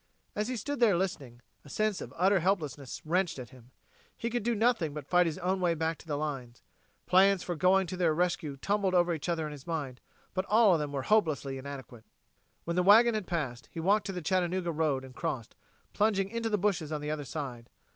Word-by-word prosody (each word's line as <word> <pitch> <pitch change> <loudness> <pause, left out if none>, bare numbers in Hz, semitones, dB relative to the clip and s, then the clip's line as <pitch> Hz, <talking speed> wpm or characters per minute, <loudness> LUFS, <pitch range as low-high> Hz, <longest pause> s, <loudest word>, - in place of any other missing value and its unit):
As 210 +1 -1
he 255 0 -3
stood 285 +5 -4
there 215 -7 +4
listening, 140 -11 -4 0.2
a 145 - -14
sense 215 +4 0
of - - -7
utter 190 +3 +4
helplessness 155 -8 -2
wrenched 180 +1 0
at 125 -3 -8
him. 125 -2 -16 0.5
He 235 - -3
could 240 - -1
do 235 +2 0
nothing 215 -9 +1
but 150 -3 -6
fight 180 +3 +3
his 160 - -3
own 185 +1 -1
way 170 -2 +2
back 160 0 -2
to - - -15
the 145 -2 -2
lines. 135 -5 -5 0.4
Plans 190 0 +4
for 175 - -3
going 185 +4 +3
to 180 - -5
their 175 -3 +2
rescue 165 -3 -1
tumbled 200 +3 0
over 175 -1 +3
each 160 +2 -4
other 165 -2 0
in 150 - -5
his 145 0 -11
mind, 145 -7 -4 0.3
but 185 0 -1
all 215 -1 +5
of 165 - +2
them 150 -1 -3
were 140 -2 -3
hopelessly 150 -9 +1
inadequate. 130 -4 -9 0.6
When 170 - -3
the 180 - +3
wagon 225 +5 +7
had 210 -4 -3
passed, 130 -9 -3
he - - -6
walked 200 +5 +2
to - - -2
the 180 -3 -5
Chattanooga 180 0 0
road 150 -4 0
and 130 - -12
crossed, 120 -4 -4 0.4
plunging 200 -2 +1
into 230 +1 -2
the 210 - +1
bushes 180 -6 0
on 150 -1 -2
the 150 0 -3
other 150 -1 -3
side. 130 -5 -6
175 Hz, 225 wpm, -30 LUFS, 145-195 Hz, 0.6 s, wagon